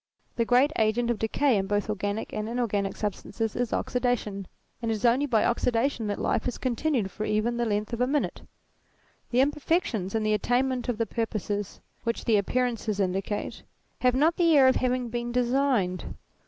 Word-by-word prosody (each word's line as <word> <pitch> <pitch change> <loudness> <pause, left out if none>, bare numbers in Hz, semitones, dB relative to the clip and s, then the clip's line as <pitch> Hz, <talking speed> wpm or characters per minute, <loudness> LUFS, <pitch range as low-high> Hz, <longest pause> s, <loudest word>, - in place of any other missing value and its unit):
The 230 - +1
great 250 +5 +4
agent 230 +2 +2
of 235 - -2
decay 235 +2 +2
in 195 0 -1
both 205 0 0
organic 205 0 -3
and 215 +1 -3
inorganic 210 -5 -1
substances 215 +1 -3
is 245 -1 -1
oxidation, 235 -6 -1 0.3
and 230 - -2
it 225 - +1
is 215 - -3
only 255 +5 +3
by 225 -5 +2
oxidation 240 0 +1
that 205 - -2
life 230 - 0
is 250 - -3
continued 255 -4 -1
for 215 - -5
even 215 +3 0
the 240 -1 0
length 210 +2 -1
of 235 - -2
a 250 - +3
minute. 290 +1 -1 0.9
The 250 +1 +3
imperfections 275 - 0
in 220 - +1
the 215 0 +2
attainment 245 +4 0
of 240 - -1
the 230 - 0
purposes 205 -2 -3 0.2
which 230 0 -2
the 220 -2 +4
appearances 230 -1 -1
indicate, 195 +2 -2 0.4
have 250 0 +3
not 315 +5 +3
the 335 -3 +5
air 265 -2 +7
of 260 - +4
having 250 -1 0
been 240 +1 -3
designed. 245 -7 +1
235 Hz, 180 wpm, -27 LUFS, 210-250 Hz, 0.9 s, air